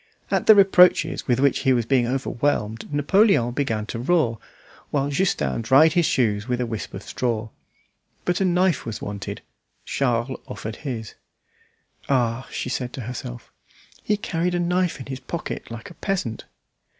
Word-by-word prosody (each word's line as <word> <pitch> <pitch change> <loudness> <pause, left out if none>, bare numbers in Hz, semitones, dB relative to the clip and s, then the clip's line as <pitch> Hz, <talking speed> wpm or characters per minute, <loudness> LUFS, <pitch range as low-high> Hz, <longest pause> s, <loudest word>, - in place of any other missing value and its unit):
At - - +1
the 220 - +10
reproaches 190 -2 +5
with 125 -1 +2
which 140 -1 +3
he 130 - +3
was 120 -3 +1
being 125 -1 +2
overwhelmed 125 -3 -1
Napoleon 145 - +3
began 115 -5 -1
to 115 - -5
roar, 125 - +1 0.5
while 140 0 0
Justin 135 - 0
dried 135 +7 +5
his 170 -2 +3
shoes 105 -3 +1
with 125 -1 -1
a 125 - 0
wisp 110 -3 -5
of - - -7
straw. 115 -3 -2 0.8
But 180 +2 0
a - - +3
knife 180 -2 +2
was 115 -3 -5
wanted; 100 -1 -6 0.4
Charles 125 -1 -1
offered 110 0 -6
his. 120 -7 -5 1.0
"Ah!" 125 -2 +1
she - - -4
said 125 -1 -3
to 130 - -5
herself, 110 - -7 0.5
"he 210 - 0
carried 175 -2 -1
a - - 0
knife 180 -1 0
in 130 - -7
his 130 -1 -6
pocket 155 +5 -6
like 115 -1 -8
a - - -10
peasant." 165 - -3
130 Hz, 160 wpm, -23 LUFS, 115-170 Hz, 1.0 s, the